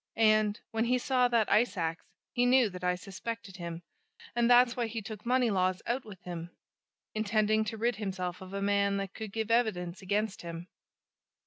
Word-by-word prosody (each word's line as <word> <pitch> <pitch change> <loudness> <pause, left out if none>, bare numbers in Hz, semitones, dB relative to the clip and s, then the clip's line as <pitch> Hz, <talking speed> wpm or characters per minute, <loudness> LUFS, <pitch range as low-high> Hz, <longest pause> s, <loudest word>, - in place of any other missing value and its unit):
And 215 -2 +3
when 225 +1 +1
he 250 +1 +3
saw 250 0 +2
that 235 -3 +2
ice 220 0 +3
ax, 165 -1 -2 0.3
he 245 0 +3
knew 250 -4 +5
that 180 0 -9
I 180 0 +2
suspected 195 +2 -7
him, 170 -1 -6 0.5
and 240 0 +3
that's 245 0 +6
why 240 -2 0
he 225 +1 -4
took 215 +1 -8
Moneylaws 200 -8 +2
out 250 +3 -1
with 195 -4 -11
him, 175 -1 -6 0.6
intending 215 0 +2
to 220 +1 -4
rid 235 0 0
himself 185 -4 -4
of 190 0 -9
a 200 0 -3
man 200 0 +2
that 195 0 -4
could 220 -2 -6
give 220 +1 -2
evidence 195 -7 +1
against 205 +2 -1
him. 170 +1 -7
210 Hz, 185 wpm, -31 LUFS, 185-230 Hz, 0.6 s, that's